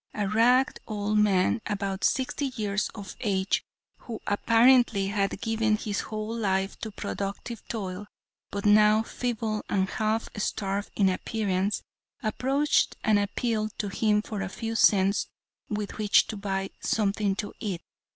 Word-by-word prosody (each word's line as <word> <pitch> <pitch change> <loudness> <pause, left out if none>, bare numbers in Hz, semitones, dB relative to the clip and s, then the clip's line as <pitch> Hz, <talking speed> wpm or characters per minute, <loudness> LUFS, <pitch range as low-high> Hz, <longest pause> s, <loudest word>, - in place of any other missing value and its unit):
A 205 -2 0
ragged 245 +5 +3
old 210 0 0
man, 205 +2 +3
about 195 -1 -2
sixty 265 +2 +1
years 205 -2 -1
of 200 -3 -8
age, 195 -3 0 0.4
who 230 -3 -7
apparently 230 -1 +4
had 200 -1 -1
given 225 -1 +1
his 210 -1 -3
whole 215 +1 -4
life 195 -3 0
to 220 - -4
productive 200 +2 -5
toil, 200 -2 -4 0.4
but 200 0 -4
now 210 +1 +6
feeble 225 -3 -2
and 190 -1 +1
half 220 +3 -1
starved 200 -1 -2
in 200 - +3
appearance, 195 0 -1 0.4
approached 270 +7 +1
and 215 -1 +4
appealed 215 +1 -1
to 205 - -2
him 210 +1 +2
for 210 -3 -5
a 190 - -3
few 225 +3 -4
cents 200 -2 +4 0.4
with 210 0 -4
which 210 -1 +5
to 220 - -3
buy 195 -1 -3
something 200 -2 0
to 205 +1 -4
eat. 195 -6 -4
210 Hz, 140 wpm, -27 LUFS, 195-220 Hz, 0.4 s, now